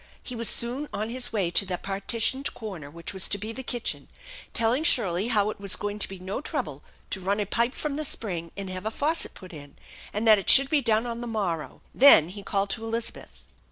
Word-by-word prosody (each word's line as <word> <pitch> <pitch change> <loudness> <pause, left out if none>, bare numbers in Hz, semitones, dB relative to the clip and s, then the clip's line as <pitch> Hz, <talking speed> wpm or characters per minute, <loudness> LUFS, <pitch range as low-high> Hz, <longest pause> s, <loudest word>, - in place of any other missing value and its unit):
He 250 - -6
was 230 -1 +3
soon 255 +5 +1
on 215 +3 -3
his 250 0 +2
way 195 -6 -1
to 190 - +3
the 185 -2 -4
partitioned 225 +8 -2
corner 185 -10 -7
which 170 +5 -7
was 190 -1 -1
to 205 - -1
be 215 +3 -6
the 260 - -6
kitchen, 240 -2 -3 0.4
telling 230 +6 +1
Shirley 205 - +4
how 215 -3 +2
it - - -11
was 200 -1 +2
going 205 0 -4
to - - 0
be 195 - -8
no 190 +7 -5
trouble - - -4 0.3
to 190 - -1
run 200 +3 0
a 205 - 0
pipe 235 +5 0
from 295 -2 -4
the 310 - -2
spring 175 - -2
and 200 -1 -5
have 185 +3 -5
a - - +1
faucet 300 +8 -1
put 185 -1 -12
in, 145 -2 -11 0.4
and 215 +2 -2
that 215 -2 +7
it 195 - -4
should 275 0 +7
be 300 -2 +3
done 225 -1 +2
on 235 0 -5
the 240 - -5
morrow, 190 -9 -3
Then 240 - +7
he 200 +2 -8
called 195 0 -1
to 225 - 0
Elizabeth. 230 +1 -6
215 Hz, 230 wpm, -26 LUFS, 195-235 Hz, 0.4 s, that